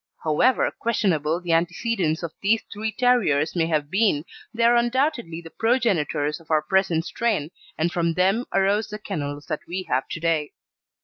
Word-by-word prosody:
However 165 +12 +2
questionable 175 -8 0
the 175 -2 -1
antecedents 175 0 0
of 165 - -4
these 215 +3 +2
three 220 +2 -3
terriers 200 - +2
may 165 -2 +1
have 150 -2 -1
been, 195 -7 +2 0.3
they 230 0 -1
are 235 +1 +5
undoubtedly 240 - 0
the 165 -1 -12
progenitors 175 - 0
of 165 - -20
our 155 -1 +2
present 175 -2 +1
strain, 200 -11 -1 0.3
and 165 +2 0
from 170 -1 0
them 195 +7 +2
arose 200 +3 +2
the 210 - -6
kennels 145 -8 -5
that - - -3
we 185 +2 -3
have 130 -6 -1
to - - -5
day. 160 -3 0
175 Hz, 170 wpm, -24 LUFS, 155-220 Hz, 0.3 s, are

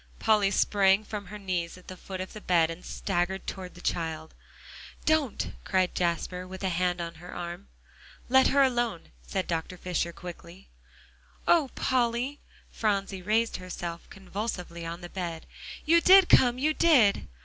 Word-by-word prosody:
Polly 210 -3 +3
sprang 195 0 +3
from 205 -2 -6
her 210 +3 -8
knees 180 -4 -3
at 180 - -17
the 185 - -7
foot 190 +1 -8
of 185 - -7
the 215 - -9
bed, 165 -4 +3
and 165 +2 -9
staggered 190 0 -2
toward 185 -1 -6
the 175 - -12
child. 160 -2 -3 0.7
"Don't!" 310 -7 +1
cried 185 -2 +1
Jasper, 180 +1 -2
with 190 +1 -9
a 190 - +1
hand 180 0 0
on 170 -1 -4
her 180 - -9
arm. 175 +2 -6 0.6
"Let 265 +1 +5
her 280 0 +4
alone," 240 -8 -1
said 190 -2 -3
Dr. 165 +2 -3
Fisher 175 -1 -2
quickly. 175 +2 -11 0.8
"Oh, 320 -6 +4
Polly!" 250 +2 0 0.3
Phronsie 195 -3 -1
raised 220 +4 +1
herself 175 -2 -7
convulsively 185 -4 -5
on 170 +2 -6
the 175 - -8
bed. 170 -4 -5 0.4
"You 335 +2 +5
did 380 0 +7
come 245 -1 +5
you 305 +4 +1
did!" 275 -13 +4
190 Hz, 160 wpm, -28 LUFS, 175-225 Hz, 0.8 s, did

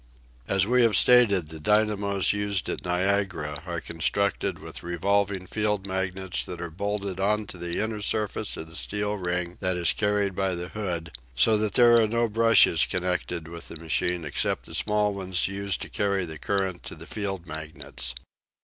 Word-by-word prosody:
As 95 -1 +2
we 125 +3 +3
have 115 -4 +4
stated, 100 -9 +6
the 80 0 -8
dynamos 105 +1 +2
used 100 -2 -1
at - - -4
Niagara 90 -5 -1
are 85 -1 -2
constructed 85 +5 -1
with - - -7
revolving 95 +2 0
field 105 -1 -1
magnets 95 -1 -2
that 90 - -7
are 85 -1 -5
bolted 100 +1 -3
on 105 +2 +1
to 95 - -8
the 85 0 -3
inner 110 -1 -2
surface 105 0 -1
of 80 - -5
the 80 +1 -10
steel 105 +3 -1
ring 90 -1 -2
that 90 -2 -1
is 85 -1 +3
carried 105 -2 0
by 95 -1 0
the 90 +1 -5
hood, 85 -7 -4 0.2
so 110 - +4
that 105 -2 -1
there 120 -1 +7
are 110 -2 +4
no 115 +2 +1
brushes 110 -7 +5
connected 90 -2 -2
with 85 0 -8
the - - -8
machine 85 +1 0
except 75 - -1
the - - -8
small 105 -1 +1
ones 95 -2 -1
used 100 -1 -3
to - - -7
carry 100 -2 0
the 80 -2 -8
current 95 -2 -1
to - - -7
the - - -11
field 95 -4 -4
magnets. 75 -4 -5
95 Hz, 180 wpm, -26 LUFS, 85-105 Hz, 0.2 s, there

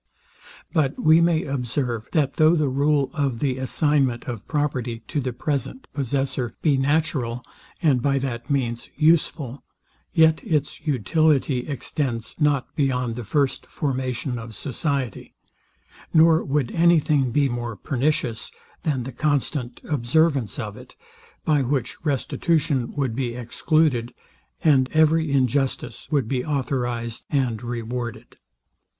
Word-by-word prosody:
But 150 -5 +1
we 160 +1 +5
may 170 -1 +3
observe, 125 -4 -2
that 145 -4 +1
though 155 +1 +5
the 150 -4 +1
rule 140 +1 +2
of 140 -5 0
the 130 +1 -1
assignment 130 -2 +1
of 120 -5 -6
property 125 -6 -2
to 150 - -1
the 130 -1 -2
present 140 - -3
possessor 135 -3 -2
be 150 -4 +4
natural, 135 -4 0 0.4
and 135 -6 +4
by 140 +1 +2
that 125 -3 -4
means 120 -5 -1
useful, 150 -4 +2 0.5
yet 160 -2 +4
its 150 -2 -1
utility 140 - +2
extends 130 -4 -3
not 145 -4 +1
beyond 125 -4 0
the 120 - -5
first 140 +4 0
formation 130 -2 -2
of 115 -1 -9
society; 140 - -3 0.8
nor 160 0 +5
would 135 -4 0
any 170 0 +5
thing 145 -4 +1
be 140 +3 +2
more 120 -2 -3
pernicious, 125 0 -1 0.3
than 135 -5 -1
the 135 - -6
constant 140 -3 -1
observance 140 - +1
of - - -5
it; - - -14 0.5
by 150 -3 +3
which 135 +2 -2
restitution 145 -1 0
would 135 -6 -1
be 120 -2 -2
excluded, 125 +1 +1 0.5
and 135 -5 +4
every 160 0 +3
injustice 135 0 0
would 140 -7 +1
be 125 0 -1
authorized 120 -5 -2
and 125 -6 0
rewarded. 120 0 -5
135 Hz, 130 wpm, -23 LUFS, 125-150 Hz, 0.8 s, we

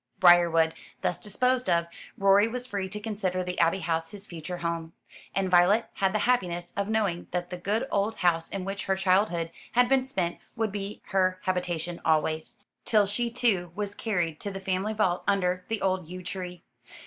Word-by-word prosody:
Briarwood 170 -3 +6 0.3
thus 180 - 0
disposed 250 +2 0
of, 170 -1 +3 0.3
Rorie 195 +2 +5
was 250 +2 -4
free 200 -6 -3
to 210 +2 -5
consider 195 -4 -2
the 180 0 -4
Abbey 170 +3 +3
House 165 -1 -1
his 200 +1 -10
future 170 0 -6
home; 165 -1 -3 0.4
and 195 0 +1
Violet 185 +5 +4
had 195 -2 +1
the 215 - +1
happiness 175 -8 0
of 200 0 -1
knowing 205 -6 0
that 180 0 -3
the 180 - -4
good 210 +8 -1
old 205 +2 +1
house 165 -2 +1
in 195 -2 -4
which 200 +1 -4
her 190 - +1
childhood 185 -3 +2 0.2
had 245 +1 +5
been 265 0 +3
spent 185 -10 -2 0.2
would 225 -3 0
be 200 0 -5
her 185 -1 +2
habitation 175 -2 -2
always, 155 0 0 0.3
till 210 -2 +4
she 235 +4 -1
too 210 -8 +1
was 205 -1 -3
carried 175 -8 -1
to 205 - -4
the 195 -1 -5
family 190 +3 -1
vault 185 -5 +1
under 185 -2 +1
the 225 -2 -2
old 185 -3 0
yew 180 +2 -8
tree. 180 -1 -6
190 Hz, 185 wpm, -28 LUFS, 175-205 Hz, 0.4 s, Briarwood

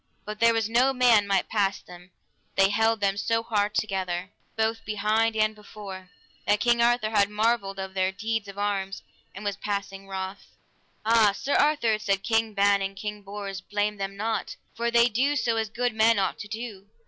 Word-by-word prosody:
But 210 0 -6
there 230 0 +5
was 225 -2 +1
no 250 +4 +3
man 240 -5 +4
might 195 -1 +1
pass 200 -3 0
them, 175 0 -14 0.5
they 195 0 +5
held 225 +1 +2
them 200 -1 +1
so 225 +2 0
hard 210 -2 0
together 185 -3 -2 0.3
both 225 0 0
behind 215 +2 +1
and 215 0 +2
before, 200 -3 -10 0.4
that 205 0 +3
King 240 0 +3
Arthur 235 -2 +2
had 200 -2 +3
marvel 215 0 +1
of 190 0 -5
their 190 0 +1
deeds 220 +1 -3
of 200 0 -10
arms, 200 -1 -2 0.3
and 205 +2 -8
was 200 -1 -2
passing 200 -1 -4
wroth. 190 0 -7 0.5
Ah, 220 -2 +5
Sir 275 +7 -3
Arthur, 265 -8 +3
said 195 -2 0
King 225 -1 0
Ban 200 0 +3
and 195 0 -3
King 210 +1 -5
Bors, 200 -1 -6
blame 205 +1 -2
them 195 0 -5
not, 220 +2 -2 0.2
for 235 +1 -1
they 235 0 +5
do 255 +5 +1 0.2
as 225 -1 0
good 245 +2 -1
men 220 +1 +4
ought 195 - 0
to 205 - -7
do. 215 -3 -7
210 Hz, 185 wpm, -26 LUFS, 195-225 Hz, 0.5 s, there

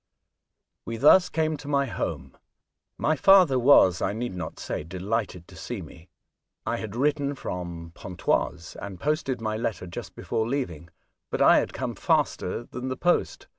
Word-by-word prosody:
We 115 - -5
thus 155 +9 +6
came 155 -1 0
to 145 - -11
my 140 -1 +2
home. 125 - -4 0.6
My 155 - +1
father 175 -3 +6
was, 120 -9 +6
I 100 - 0
need 120 0 -4
not 90 - -6
say, - - -4
delighted 95 +1 -3
to 90 - -14
see 95 +6 -6
me. 80 +2 -14 0.6
I - - -1
had 110 -1 -6
written 145 +2 0
from 85 -6 -6
Pontoise, 90 -2 -2
and 95 -3 -7
posted 145 - -1
my 110 -1 -2
letter 110 -4 -3
just 85 - -8
before 110 0 -2
leaving; 85 - -3 0.4
but - - -3
I - - +7
had - - -2
come - - -4
faster 90 - 0
than 125 +2 -7
the 130 - -3
post. 175 0 0
115 Hz, 165 wpm, -26 LUFS, 90-140 Hz, 0.6 s, I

